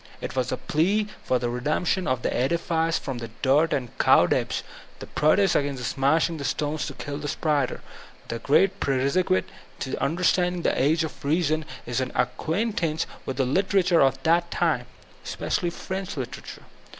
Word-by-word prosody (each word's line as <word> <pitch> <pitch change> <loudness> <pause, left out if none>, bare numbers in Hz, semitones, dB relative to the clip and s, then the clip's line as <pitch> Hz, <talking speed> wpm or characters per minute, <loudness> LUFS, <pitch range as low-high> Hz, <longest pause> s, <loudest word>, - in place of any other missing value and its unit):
It - - -6
was 130 -1 0
the - - -1
plea 195 +8 +1 0.2
for 130 - +1
the 120 -1 -2
redemption 155 +9 0
of 130 -1 0
the - - -1
edifice 165 +4 +1
from 130 -3 -5
the 115 -1 -6
dirt 145 +5 +4
and 125 -4 -2
cobwebs, - - +3 0.3
the - - -8
protest 175 +5 +3
against 140 -3 -1
smashing 160 +5 +1
the 140 - -5
stones 150 +2 -1
to - - -7
kill 145 0 -5
die 145 - -5
spiders. 145 -3 0 0.5
The 115 - -4
great 190 +10 +3
prerequisite 140 +8 +1 0.3
to 130 - -4
the - - -3
understanding 175 +4 +1
of - - -12
the - - 0
''Age 155 +4 +3
of 160 - -7
Reason" 155 +1 +1 0.2
is 120 +2 -1
an 130 - -3
acquaintance 165 -3 0 0.2
with 135 - -3
the 135 - +2
lit 190 +10 +1
erature 180 -4 +4
of 135 0 +4
that 170 +1 +3
time— 155 -10 0 0.4
especially 175 - -2
French 190 0 -5
literature. 130 -3 -7
155 Hz, 175 wpm, -25 LUFS, 135-175 Hz, 0.5 s, dirt